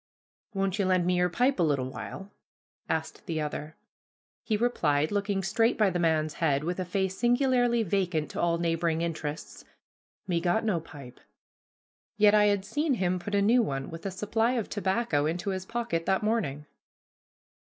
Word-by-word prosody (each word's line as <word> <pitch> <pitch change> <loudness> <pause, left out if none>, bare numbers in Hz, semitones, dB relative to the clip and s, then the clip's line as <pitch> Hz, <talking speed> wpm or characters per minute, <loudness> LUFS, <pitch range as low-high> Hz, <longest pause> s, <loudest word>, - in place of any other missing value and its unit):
"Won't 195 +1 -1
you 200 - +2
lend 185 -1 +2
me 180 0 +2
your 180 0 +2
pipe 250 +6 +1
a - - +3
little 140 -6 +1
while?" 195 +8 -8 0.6
asked 160 +3 -3
the 165 -3 -2
other. 150 +1 -4 0.7
He 215 - 0
replied, 155 -11 +1
looking 200 -1 -1
straight 225 +6 +2
by 210 -3 +3
the 175 - -1
man's 155 -2 +1
head, 145 -3 +2
with 175 +3 -2
a 185 - -1
face 190 +1 -1
singularly 245 -1 +3
vacant 175 -5 -1
to - - -3
all 170 -1 +2
neighboring 165 -1 0
interests, 155 -2 -5 0.6
"Me 175 -3 0
got 185 +6 +1
no 200 -6 +1
pipe"; 140 -6 -12 1.0
yet 210 0 +6
I 210 -1 +5
had 200 -2 +1
seen 295 +5 0
him 185 -3 0
put 205 +4 -4
a 200 - +3
new 235 +4 +5
one, 135 -10 -3
with 165 +4 -6
a - - -1
supply 225 +5 0
of 235 -5 -2
tobacco, 190 -7 0
into 180 +5 -2
his 190 0 -4
pocket 230 -8 -2
that 190 +2 +1
morning. 175 -11 -1
185 Hz, 175 wpm, -28 LUFS, 165-210 Hz, 1.0 s, yet